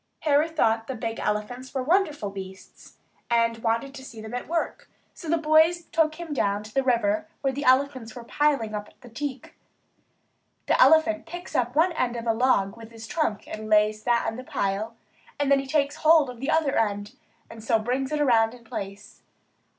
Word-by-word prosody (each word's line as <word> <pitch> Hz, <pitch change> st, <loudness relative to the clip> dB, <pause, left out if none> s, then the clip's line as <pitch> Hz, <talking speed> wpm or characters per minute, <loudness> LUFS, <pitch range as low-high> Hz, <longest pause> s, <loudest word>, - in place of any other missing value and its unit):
Harry 300 Hz, +1 st, +3 dB
thought 225 Hz, -8 st, +1 dB
the 265 Hz, -, -4 dB
big 225 Hz, 0 st, -4 dB
elephants 245 Hz, +6 st, -3 dB
were 260 Hz, -, 0 dB
wonderful 300 Hz, -, +1 dB
beasts, 190 Hz, -1 st, -11 dB, 0.3 s
and 230 Hz, -1 st, +2 dB
wanted 230 Hz, +4 st, -1 dB
to 270 Hz, -2 st, -10 dB
see 230 Hz, -4 st, -10 dB
them 220 Hz, +1 st, -8 dB
at 245 Hz, -, -4 dB
work; 335 Hz, 0 st, -3 dB, 0.2 s
so 330 Hz, -, -9 dB
the 335 Hz, -, +3 dB
boys 320 Hz, +2 st, +4 dB
took 315 Hz, -1 st, +2 dB
him 335 Hz, -2 st, -6 dB
down 205 Hz, -5 st, 0 dB
to 215 Hz, 0 st, -12 dB
the 270 Hz, -, +2 dB
river 305 Hz, +6 st, +1 dB
where 270 Hz, -1 st, 0 dB
the 285 Hz, +2 st, -4 dB
elephants 260 Hz, -3 st, +2 dB
were 240 Hz, -, -8 dB
piling 275 Hz, -4 st, 0 dB
up 210 Hz, 0 st, -5 dB
the 245 Hz, -, -13 dB
teak. 265 Hz, +2 st, -6 dB, 1.1 s
An -, -, +3 dB
elephant 315 Hz, +4 st, +5 dB
picks 350 Hz, +2 st, -8 dB
up 245 Hz, 0 st, 0 dB
one 335 Hz, +4 st, +4 dB
end 250 Hz, -7 st, -1 dB
of 235 Hz, 0 st, -5 dB
a 225 Hz, -, +2 dB
log 225 Hz, -4 st, +2 dB
with 225 Hz, -1 st, -12 dB
his 225 Hz, -1 st, -10 dB
trunk 230 Hz, -7 st, -2 dB
and 215 Hz, 0 st, -7 dB
lays 215 Hz, 0 st, +3 dB
that 235 Hz, +1 st, +1 dB
on 225 Hz, -, -3 dB
the 255 Hz, -, -7 dB
pile; 210 Hz, 0 st, -2 dB, 0.4 s
then 280 Hz, -1 st, +3 dB
he 270 Hz, -, -5 dB
takes 285 Hz, 0 st, 0 dB
hold 310 Hz, -4 st, +4 dB
of 245 Hz, -, -13 dB
the 270 Hz, +4 st, -3 dB
other 315 Hz, -3 st, +2 dB
end 205 Hz, -2 st, -1 dB, 0.3 s
and 225 Hz, -1 st, -11 dB
so 225 Hz, 0 st, +3 dB
brings 255 Hz, +5 st, -2 dB
it 300 Hz, -, -1 dB
around 230 Hz, -5 st, +3 dB
in 240 Hz, -, -17 dB
place. 200 Hz, -2 st, -8 dB
250 Hz, 195 wpm, -25 LUFS, 225-295 Hz, 1.1 s, elephant